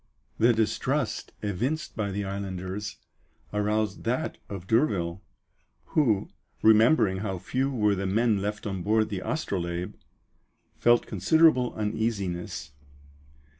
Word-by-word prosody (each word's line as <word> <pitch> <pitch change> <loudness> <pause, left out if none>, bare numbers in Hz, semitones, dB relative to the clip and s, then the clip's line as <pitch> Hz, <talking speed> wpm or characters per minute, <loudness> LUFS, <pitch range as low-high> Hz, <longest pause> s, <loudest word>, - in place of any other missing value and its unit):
The 115 +2 +6
distrust 120 +3 -1
evinced 125 - -2
by 105 -3 -1
the 100 +1 -3
islanders 95 +1 -4 0.6
aroused 105 0 0
that 125 +8 -1
of 95 -3 -6
D'Urville, 95 - +1 0.7
who, 115 -11 +2 0.4
remembering 110 -2 +5
how 95 -1 -3
few 130 +9 -1
were 105 -6 +2
the 95 0 -2
men 110 +1 +2
left 105 +1 -3
on 95 -3 -3
board 110 +3 +2
the 100 -4 -3
Astrolabe, 90 - -2 0.9
felt 120 0 +4
considerable 125 - +3
uneasiness. 105 -8 -2
105 Hz, 110 wpm, -27 LUFS, 95-115 Hz, 0.9 s, The